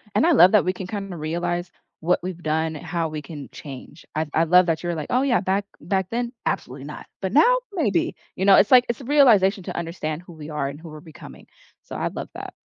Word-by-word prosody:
And - - +4
I 345 - +4
love 190 - +7
that 210 - +5
we 185 - +1
can 185 0 -7
kinda 195 -2 -5
realize 175 +3 -3 0.3
what 175 +2 +2
we've 180 -1 -5
done, 160 0 -1
and - - -11
how 165 -2 -2
we 155 -1 -5
can 145 -1 -9
change. 145 +3 -11
I 155 +1 0
I 165 - +3
love 180 +2 +5
that 165 -1 0
you 175 - -3
were 170 - -1
like, 155 -2 -5
"Oh 250 - +2
yeah, 265 -3 +2
back 195 +1 0 0.2
back 190 +3 -1
then, 240 +1 -2
absolutely 135 +2 -3
not, 150 - -9
but 190 -1 -3
now, 475 - +6 0.2
maybe." 215 - 0 0.2
You 190 - 0
know? 200 -1 +8
It's 200 - +4
like 250 -1 +7
it's 235 +3 -3
a - - -10
realization 220 -9 +4
to - - -6
understand 165 -2 -4
who 180 - -14
we 155 -1 -10
are, 150 -2 -2
and 140 +1 -9
who 165 - -11
we're 155 0 -10
becoming, 160 -3 -13 0.4
so, - - -9
I - - -1
love - - -6
that. - - -7
175 Hz, 250 wpm, -23 LUFS, 155-200 Hz, 0.4 s, know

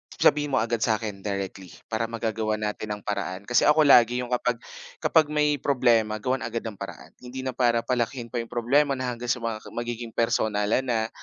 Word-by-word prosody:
sabihin 145 -1 +3
mo - - +4
agad 115 0 -1
sa'kin 110 -2 -1
directly 100 -2 -4 0.2
para 115 +1 0
magagawan 110 -1 -2
natin 105 0 -3
ang 105 - -12
paraan, 100 -2 -3
kasi 120 +3 +3
ako 150 +1 +6
lagi 125 -3 +6
'yong 125 - -8
kapag 125 0 +1 0.5
kapag 160 -2 +4
may 150 -2 +2
problema 120 -6 +2
gawan 130 +1 0
agad 115 0 -3
ng 110 -4 -7
paraan, 100 - -8
hindi 125 +1 -7
na 130 - -2
para 120 -2 +2
palakihin 120 -1 -2
pa 120 - -2
'yong 115 - -4
problema 135 +4 +2
na 130 -1 -2
hanggang 120 0 -6
sa 120 -2 -2
mga 110 -1 -2 0.2
magiging 120 -1 -4
personalan 110 +2 +1
na. 110 -2 0
115 Hz, 190 wpm, -26 LUFS, 110-125 Hz, 0.5 s, ako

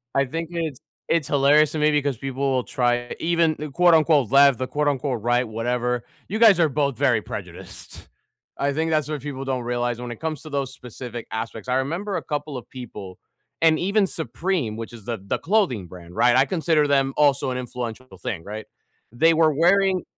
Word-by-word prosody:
I 135 - +3
think 165 +5 -4
it's 160 -6 -3 0.3
it's 165 -4 +1
hilarious 145 +2 +4
to 155 - -2
me 150 0 +3
because 145 -4 0
people 135 +1 -2
will 130 -1 +1
try, 120 -1 -1
even 165 -1 +2
the 150 - -5
quote 175 +4 +4
unquote 150 -6 +3
"left" 140 -2 +6
the 130 0 -3
quote 150 0 -1
unquote 135 -4 -1
"right" 120 +2 +1
whatever, 120 +2 -1 0.2
you 215 +3 -3
guys 215 -6 +7
are 160 - +4
both 140 -2 -1
very - - +2
prejudiced. - - -9 0.5
I 140 - 0
think 160 +2 -1
that's 155 -1 +1
what 150 -3 -3
people 135 -1 -6
don't 130 -2 -2
realize 120 0 -2
when 125 -1 -6
it 120 - -8
comes 155 -3 -4
to 155 - -9
those 140 -2 -3
specific 120 -1 -8
aspects. 115 +1 -5
I 125 - +1
remember 170 +9 -2
a - - -5
couple 150 -1 -4
of 120 - -10
people, 105 -7 -9 0.4
and 160 -1 +5
even 200 +2 +2
Supreme, 160 - -2
which 115 +1 -7
is 110 -4 -12
the 115 -3 -3
the - - -1
clothing 165 - +1
brand, 90 -1 -12
right? 120 0 +4
I 130 +1 +5
consider 160 -3 +1
them 135 -1 +2
also 140 -2 +3
an 125 - -3
influential 125 0 -6
thing, 90 -7 -4
right? 105 +1 -7 0.5
They 165 +8 +4
were 160 -1 +4
wearing 185 +4 +3
140 Hz, 200 wpm, -23 LUFS, 120-155 Hz, 0.5 s, guys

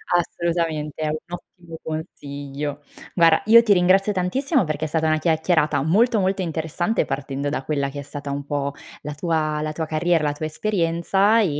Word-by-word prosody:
Assolutamente, 165 -3 -1
è - - 0
un 155 +1 -1
ottimo 170 -1 -10
consiglio. 145 -2 -5 0.3
Guarda, 165 -2 +5
io 230 +2 +8
ti 225 -3 +4
ringrazio 190 +2 +3
tantissimo 255 - +1
perché 155 -2 -2
è - - -2
stata 160 +1 0
una 155 0 +2
chiacchierata 160 -2 +2
molto, 215 - +3
molto 190 0 0
interessante 165 +4 -1
partendo 140 +1 -3
da 145 -2 -3
quella 140 -1 -1
che 145 +1 -7
è - - -4
stata 145 0 -7
un 140 0 -3
po' 140 -1 -2 0.3
la 150 +1 -5
tua 155 -1 -1
la 155 0 -2
tua 160 +1 -3
carriera, 160 +1 +1
la 145 -1 +1
tua 150 +2 -5
esperienza 190 +4 +1
e - - +3
160 Hz, 180 wpm, -22 LUFS, 150-180 Hz, 0.3 s, io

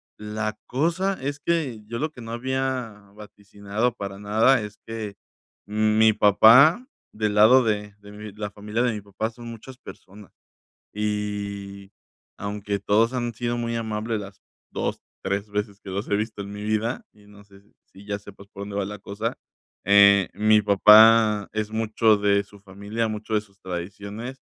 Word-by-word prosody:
La 105 0 -4
cosa 170 +8 -1
es 145 +1 -4
que, 145 -9 -1
yo 115 +2 -6
lo 155 +1 -2
que 125 - -12
no 115 - -8
había 125 -4 -3
vaticinado 105 +2 -4
para 100 -3 -7
nada, 110 +5 +3
es 105 0 -8
que 110 -3 -6 0.5
mm, 110 +1 +1
mi 110 0 +5
papá, 115 - +6 0.2
del 105 -1 -2
lado 110 +5 +7
de 105 -1 -2
de 100 0 -14
mi 105 0 -9
la 105 0 -5
familia 105 +3 -3
de 125 -2 +1
mi 105 - -6
papá 105 +2 -4
son 120 +1 -12
muchas 115 +3 -10
personas 100 -5 -14 0.6
y, 100 -1 -4 0.4
aunque 100 0 -4
todos 110 +4 +2
han 120 -1 -2
sido 120 +1 -3
muy 115 0 -3
amables 110 0 -3
las 100 -1 -11 0.3
2, - - -3 0.2
3 100 +2 -2
veces 105 0 -4
que - - -13
los 100 +2 -4
he 100 - +3
visto 105 -1 -4
en 100 0 -9
mi 105 0 -7
vida, 110 +2 -2
y 105 -1 -22
no 105 0 -16
sé 100 -1 -19
si 105 - -30
si 100 - -17
ya 100 -1 -3
sepas 100 -1 -14
por 100 -1 -10
dónde 100 0 -7
va 100 - 0
la 105 +2 -7
cosa. 100 +1 -5 0.5
Eh, 100 0 +6
mi 105 0 +4
papá 105 +1 +6
es 110 -1 -2
mucho 110 0 +2
de 100 0 +2
su 100 0 -18
familia, 100 +3 -4
mucho 110 +1 -6
de 105 - +3
sus 100 -2 -22
tradiciones 100 +8 -7
105 Hz, 175 wpm, -24 LUFS, 100-115 Hz, 0.6 s, lado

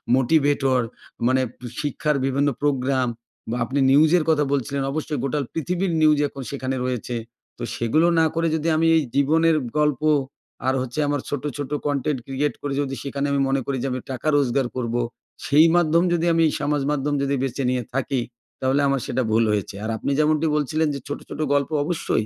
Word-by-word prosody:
Motivator, 135 -1 +2 0.5
মানে 130 +1 +3 0.4
শিক্ষার 150 0 -1
বিভিন্ন 140 +2 +1
প্রোগ্রাম 130 -2 +1 0.4
বা 115 - -1
আপনি 135 +4 -2
নিউজের 155 +4 +5
কথা 150 -2 +3
বলছিলেন, 140 +1 -1
অবশ্যই 150 -1 -3
গোটা 140 +2 -1
পৃথিবীর 180 +3 -1
নিউজই 150 -1 +4
এখন 135 -1 -8
সেখানে 135 -1 -3
রয়েছে। 125 -1 -3 0.4
তো - - -6
সেগুলো 155 +9 +2
না 160 - +5
করে 165 0 +1
যদি 160 +1 -2
আমি 165 +1 +3
এই 160 - +4
জীবনের 160 +4 +3 0.2
গল্প 150 -3 +1 0.7
আর 130 - +3
হচ্ছে 130 +3 -4
আমার 145 -1 0
ছোটো, 145 +1 -3
ছোটো 145 0 -3
কন্টেন্ট 145 -1 -1
ক্রিয়েট 135 0 -1
করে 145 -1 -3
যদি 135 -1 -3
সেখানে 140 0 -2
আমি 140 -1 +1
মনে 135 0 +1
করি 140 -1 -2
যে, 135 - 0
আমি 130 - -2
টাকা 130 +3 -4
রোজগার 135 -1 +1
করবো, 120 -1 -1 0.4
সেই 150 +3 +6
মাধ্যম 170 -1 +3
যদি 170 -1 +1
আমি 165 0 +3 0.2
সামাজিক 145 -1 0
মাধ্যম 145 0 -1
যদি 140 0 0
বেছে 135 +1 -2
নিয়ে 125 -1 0
থাকি, 135 -1 -1 0.4
তাহলে 130 +2 +2
আমার 135 -1 +1
সেটা 130 - -1
ভুল 115 +1 +4
হয়েছে। 100 -2 -2
আর 110 - -3
আপনি 140 - -2
যেমনটি 155 +1 +2
বলছিলেন 155 +2 +1
যে 140 - -4
ছোটো, 145 - -5
ছোটো 155 - -3
গল্প 140 -1 +1
অবশ্যই 150 -8 -1
140 Hz, 185 wpm, -23 LUFS, 130-150 Hz, 0.7 s, সেই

